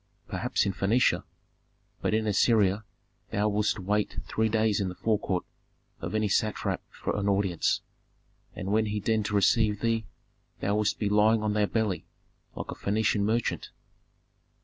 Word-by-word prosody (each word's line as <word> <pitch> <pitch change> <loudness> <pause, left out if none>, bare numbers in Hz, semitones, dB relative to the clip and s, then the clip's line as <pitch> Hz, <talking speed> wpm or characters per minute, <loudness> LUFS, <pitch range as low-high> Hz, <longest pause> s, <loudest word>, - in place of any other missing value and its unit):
"Perhaps - - 0
in 100 - 0
Phœnicia. 110 +7 +2 0.8
But - - +1
in 110 0 +1
Assyria 105 -1 +3 0.5
thou 105 +1 +1
wouldst 105 0 +1
wait 105 +2 -1
three 110 0 0
days 110 -1 +2
in 95 - -1
the 90 - -7
forecourt 100 -4 0 0.5
of - - -4
any 110 -1 +2
satrap 105 +2 0
for - - -4
an 100 -1 0
audience, 95 -4 +1 0.7
and 95 +2 -4
when 110 +1 +2
he 105 0 -1
deigned 110 0 0
to 105 - -2
receive 105 +1 +3
thee 115 -1 0 0.5
thou 100 - 0
wouldst 105 -1 +1
be 105 - -1
lying 105 +2 +4
on 105 -1 +1
thy 105 -1 +2
belly, 110 -4 -1 0.5
like - - -5 0.2
any 105 +2 +1
Phœnician 105 -1 +2
merchant." 110 +3 0
105 Hz, 155 wpm, -28 LUFS, 100-110 Hz, 0.8 s, lying